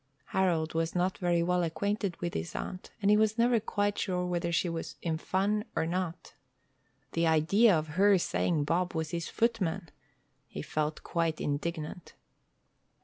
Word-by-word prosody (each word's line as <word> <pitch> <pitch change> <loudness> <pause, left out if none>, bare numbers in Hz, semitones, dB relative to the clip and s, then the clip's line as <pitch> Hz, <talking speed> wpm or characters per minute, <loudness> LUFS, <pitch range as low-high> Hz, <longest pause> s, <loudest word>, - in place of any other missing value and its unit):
Harold 170 -4 +1
was 165 +1 -1
not 180 +1 0
very 175 -2 +2
well 180 +1 +2
acquainted 190 +3 -1
with 175 0 -3
his 80 +1 -4
aunt, 185 - -5
and 200 - +5
he 210 - +6
was 220 +1 +2
never 235 0 +4
quite 205 -1 -1
sure 180 -2 -1
whether 175 -1 -1
she 175 +1 +1
was 165 -1 -4
in 165 -2 0
fun 195 +5 0
or - - +1
not. 175 0 -3 0.8
The 165 0 +1
idea 170 +6 +5
of 155 0 -3
her 200 -1 +6
saying 170 -3 0
Bob 175 +4 0
was 160 0 -2
his 170 -1 -3
footman! 195 -7 0 0.6
He 75 - -6
felt 155 - -2
quite 165 -2 -1
indignant. 155 +3 -4
175 Hz, 160 wpm, -30 LUFS, 160-195 Hz, 0.8 s, he